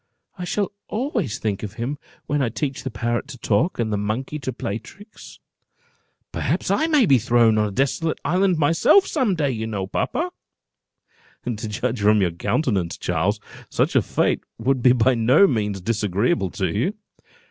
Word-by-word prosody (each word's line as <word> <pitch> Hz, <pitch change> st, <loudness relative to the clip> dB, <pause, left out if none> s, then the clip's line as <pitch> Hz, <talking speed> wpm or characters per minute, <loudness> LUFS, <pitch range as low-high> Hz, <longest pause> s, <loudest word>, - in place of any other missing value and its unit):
I 180 Hz, -, -5 dB
shall 205 Hz, +2 st, -1 dB, 0.2 s
always 220 Hz, -, -2 dB
think 105 Hz, -3 st, -2 dB
of 105 Hz, -2 st, -6 dB
him 120 Hz, +5 st, -4 dB, 0.3 s
when 145 Hz, 0 st, 0 dB
I 125 Hz, -, +1 dB
teach 135 Hz, +3 st, -3 dB
the 135 Hz, -, -4 dB
parrot 120 Hz, +2 st, -2 dB
to 140 Hz, -3 st, -9 dB
talk, 130 Hz, -, +1 dB
and 110 Hz, -2 st, -1 dB
the -, -, +1 dB
monkey 120 Hz, +8 st, -3 dB
to 130 Hz, -2 st, -3 dB
play 105 Hz, -3 st, -4 dB
tricks. 205 Hz, -, -14 dB, 0.9 s
Perhaps -, -, -1 dB
I 315 Hz, -, +2 dB
may 300 Hz, -7 st, +4 dB
be 135 Hz, -8 st, +5 dB
thrown 115 Hz, -1 st, +3 dB
on 105 Hz, -, +2 dB
a -, -, -5 dB
desolate 140 Hz, -, 0 dB
island 185 Hz, +3 st, +2 dB
myself, 165 Hz, -, +4 dB
some 255 Hz, -, 0 dB
day, 145 Hz, -4 st, 0 dB
you 110 Hz, -2 st, -3 dB
know, 100 Hz, -4 st, -3 dB
papa." 335 Hz, -, -2 dB, 1.1 s
"To 110 Hz, -2 st, -3 dB
judge 115 Hz, +2 st, -2 dB
from 105 Hz, +1 st, +4 dB
your 90 Hz, -3 st, +2 dB
countenance, 95 Hz, -, -1 dB
Charles, 90 Hz, +5 st, 0 dB, 0.3 s
such -, -, 0 dB
a -, -, +6 dB
fate -, -, 0 dB
would 130 Hz, +3 st, 0 dB
be 125 Hz, 0 st, +6 dB
by 130 Hz, +1 st, +3 dB
no 125 Hz, -, +5 dB
means 105 Hz, -, -1 dB
disagreeable 105 Hz, -, 0 dB
to 95 Hz, +3 st, -2 dB
you." 175 Hz, -, 0 dB
120 Hz, 175 wpm, -22 LUFS, 105-155 Hz, 1.1 s, a